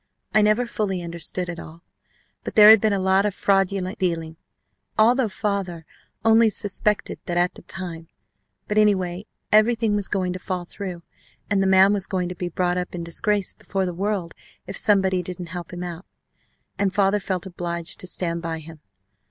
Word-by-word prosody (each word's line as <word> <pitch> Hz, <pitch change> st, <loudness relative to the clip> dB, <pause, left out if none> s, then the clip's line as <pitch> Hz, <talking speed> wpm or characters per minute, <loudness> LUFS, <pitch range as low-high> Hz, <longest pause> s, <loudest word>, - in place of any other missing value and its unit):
I 215 Hz, -, +5 dB
never 215 Hz, +4 st, +3 dB
fully 195 Hz, -6 st, -2 dB
understood 170 Hz, +1 st, -2 dB
it 170 Hz, -1 st, -6 dB
all, 165 Hz, +2 st, -11 dB, 0.6 s
but -, -, -6 dB
there 210 Hz, 0 st, +10 dB
had 220 Hz, -2 st, +7 dB
been 220 Hz, -, +2 dB
a 200 Hz, -, +1 dB
lot 190 Hz, +1 st, +3 dB
of 205 Hz, -2 st, -1 dB
fraudulent 195 Hz, -1 st, 0 dB
dealing, 165 Hz, -3 st, -2 dB, 0.6 s
although 235 Hz, +2 st, +4 dB
father 190 Hz, -5 st, -3 dB, 0.4 s
only 225 Hz, 0 st, +6 dB
suspected 205 Hz, 0 st, 0 dB
that 175 Hz, -, -1 dB
at 175 Hz, +1 st, +2 dB
the -, -, -13 dB
time, 170 Hz, -3 st, -6 dB, 0.6 s
but 210 Hz, +1 st, +2 dB
anyway, 190 Hz, -2 st, +1 dB, 0.2 s
everything 220 Hz, 0 st, +3 dB
was 205 Hz, -2 st, -1 dB
going 185 Hz, -3 st, -1 dB
to 185 Hz, -, -6 dB
fall 180 Hz, -1 st, -4 dB
through 180 Hz, -2 st, -6 dB, 0.5 s
and 200 Hz, -1 st, +3 dB
the 195 Hz, -, +2 dB
man 190 Hz, +1 st, +6 dB
was 195 Hz, -2 st, -1 dB
going 180 Hz, -3 st, -2 dB
to 180 Hz, -, -6 dB
be 175 Hz, 0 st, -4 dB
brought 180 Hz, +1 st, 0 dB
up 180 Hz, 0 st, -5 dB
in 170 Hz, -, -4 dB
disgrace 200 Hz, +4 st, 0 dB
before 195 Hz, -1 st, -3 dB
the 180 Hz, -, -3 dB
world 190 Hz, -2 st, -2 dB, 0.3 s
if -, -, -7 dB
somebody 190 Hz, -3 st, +3 dB
didn't 180 Hz, -1 st, -7 dB
help 175 Hz, -2 st, -6 dB
him 180 Hz, 0 st, -6 dB
out. 175 Hz, +1 st, -7 dB, 0.7 s
And 200 Hz, -1 st, +2 dB
father 195 Hz, +2 st, +2 dB
felt 185 Hz, -2 st, -3 dB
obliged 170 Hz, -2 st, -4 dB
to 185 Hz, -, -6 dB
stand 170 Hz, -2 st, -2 dB
by 165 Hz, -1 st, -3 dB
him. 160 Hz, 0 st, -11 dB
185 Hz, 185 wpm, -23 LUFS, 175-205 Hz, 0.7 s, there